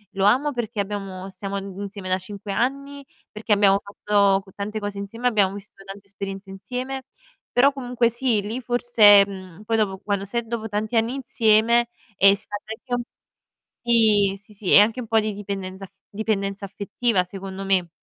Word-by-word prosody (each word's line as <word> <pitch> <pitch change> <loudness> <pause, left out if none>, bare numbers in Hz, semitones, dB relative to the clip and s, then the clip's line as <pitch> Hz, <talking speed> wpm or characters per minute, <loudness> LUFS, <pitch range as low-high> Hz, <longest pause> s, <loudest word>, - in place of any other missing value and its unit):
lo 195 - +1
amo, 265 +8 +3
perché 225 -4 -4
abbiamo 195 -2 -5
stiamo 200 +1 -5
insieme 195 0 -7
da 185 - +2
5 200 +2 -7
anni, 275 +5 -2 0.3
perché 215 0 -1
abbiamo 200 -1 +4
fatto 200 -1 +2
c 190 - -18
tante 210 +2 -4
cose 205 -1 -5
insieme, 230 +5 -3
abbiamo 200 -5 +2
vissuto 195 -1 -12
tante 195 +1 -10
esperienze 195 0 -7
insieme." 255 +6 -5 0.5
Però 275 +4 +5
comunque 245 -3 0
sì, 235 -3 0
lì 220 +5 -4
forse 230 -5 +6
mhmm, 190 0 -10
poi 225 +1 0
dopo 195 -3 0
quando 200 -1 -2
sai 235 +3 -3
dopo 225 -1 -4
tanti 215 +3 -1
anni 225 +3 +1
insieme, 235 -2 +3 0.3
ehm, 195 +1 +6
si 205 - -14
tratta 220 +4 -5
anche 240 0 -4 0.8
Sì, 215 -4 +4
sì, 210 - -18
sì, 205 -2 -3
è - - +10
anche 225 +4 +3
un 230 - -8
po' 225 0 +3
di 215 -1 -2
dipendenza 195 -1 -6
af 190 - -19 0.2
dipendenza 200 -2 -2
affettiva 200 0 -1
secondo 195 +1 -7
me. 185 -3 +1
205 Hz, 175 wpm, -23 LUFS, 195-230 Hz, 0.8 s, è